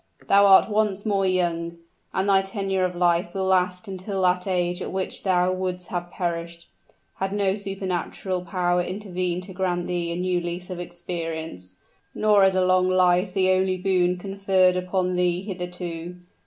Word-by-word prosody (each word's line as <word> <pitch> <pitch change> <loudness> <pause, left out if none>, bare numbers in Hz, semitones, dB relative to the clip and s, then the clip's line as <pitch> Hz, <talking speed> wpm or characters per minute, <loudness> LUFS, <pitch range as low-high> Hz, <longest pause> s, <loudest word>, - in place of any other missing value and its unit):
Thou 200 0 +6
art 195 -1 +7
once 210 -2 0
more 200 -2 +1
young 170 -2 -1 0.3
and 190 +1 -1
thy 195 -1 +5
tenure 195 -1 -1
of 180 -1 -3
life 175 0 +1
will 190 -1 -1
last 185 +1 +1
until 190 0 -3
that 180 +1 +2
age 180 -1 0
at - - -4
which 190 0 -4
thou 185 -1 +2
would'st 185 -1 -4
have 175 -1 -4
perished, 170 -2 -4 0.5
had 195 0 -2
no 200 -1 +1
superhuman 190 -2 -3
power 180 -1 +1
intervened 180 -2 -3
to 190 - -10
grant 180 -1 -1
thee 175 -1 -2
a - - -2
new 180 0 0
lease 175 +2 -5
of 180 - -5
existence! 165 - -6 0.4
Nor 210 -2 +4
is 190 -1 +3
a 185 -1 +3
long 185 0 +3
life 185 0 +3
the 185 -1 +3
only 185 0 +2
boon 180 -1 +1
conferred 190 -1 +2
upon 180 0 -1
thee 180 0 +1
hitherto. 180 -3 -6
185 Hz, 170 wpm, -24 LUFS, 175-190 Hz, 0.5 s, art